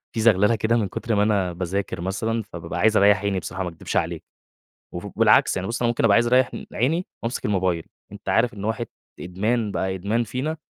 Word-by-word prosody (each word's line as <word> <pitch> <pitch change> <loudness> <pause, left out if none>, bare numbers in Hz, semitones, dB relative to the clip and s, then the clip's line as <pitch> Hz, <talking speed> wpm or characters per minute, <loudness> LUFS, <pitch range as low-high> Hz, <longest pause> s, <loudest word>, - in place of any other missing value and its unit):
في - - -1
زغللة 110 0 +4
كده 110 +2 +1
من 110 -4 0
كتر 115 +4 -2
ما 100 - +3
أنا 100 -4 +1
باذاكر 90 +1 -3
مثلًا، 110 +5 -2
فبابقى 85 -4 -7
عايز 110 +3 +4
أريَّح 100 -1 +5
عيني 100 -2 0
بصراحة، 95 +2 -5
ما 90 - -3
أكدبش 85 -2 -4
عليك، - - -1 0.7
وف 90 +3 -5
بالعكس - - +4
يعني 95 0 -2
بُص 115 - -3
أنا 120 - +3
ممكن 120 0 0
أبقى 105 -3 +5
عايز 120 +2 +4
أريح 125 +1 +4
إن - - -7
عيني 160 +10 0 0.2
وأمسك 115 +1 -3
الموبايل، 95 -5 0 0.3
أنت 100 0 -10
عارف 120 +1 +2
إن 100 -1 -7
واحد 110 +2 -2 0.3
إدمان، 105 +4 -1
بقى 95 -1 -1
إدمان 105 +6 -1
فينا، 130 +8 -3
105 Hz, 215 wpm, -23 LUFS, 95-115 Hz, 0.7 s, أريَّح